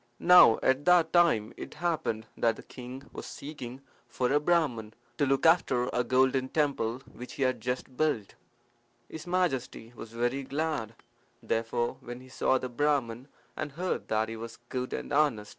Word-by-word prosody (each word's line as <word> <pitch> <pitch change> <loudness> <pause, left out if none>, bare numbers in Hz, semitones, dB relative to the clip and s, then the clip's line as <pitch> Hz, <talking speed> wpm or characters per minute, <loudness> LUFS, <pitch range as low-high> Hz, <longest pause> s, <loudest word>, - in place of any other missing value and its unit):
Now 180 -10 +7
at 130 +2 +2
that 175 -2 +4
time 160 -11 +3
it - - -8
happened 155 -9 -2
that 115 -1 +1
the - - -12
king 130 +1 -9
was - - -7
seeking 135 -3 -8 0.3
for 125 +2 -1
a 145 - +4
Brahman 145 -10 0 0.2
to 145 - +3
look 135 +3 +1
after 135 -7 +3
a 125 - +1
golden 130 +1 +2
temple 135 -5 -1
which 125 +1 -9
he 135 - -2
had 130 -1 0
just 125 +1 -2
had 130 - -22
built. 145 -10 0 0.7
His 160 +2 -9
Majesty 135 -10 -1
was 115 -1 -9
very 120 +4 -1
glad, 140 -5 -3 0.5
therefore, 115 +1 -1
when 120 0 -8
he 130 0 -15
saw 130 0 +1
the 130 - -4
Brahman 130 -2 -1 0.3
and 145 -2 -5
heard 180 +5 -3
that 110 0 +1
he 115 - -6
was 115 +1 -8
good 125 0 -3
and - - -4
honest. 140 -8 +2
130 Hz, 175 wpm, -29 LUFS, 120-150 Hz, 0.7 s, Now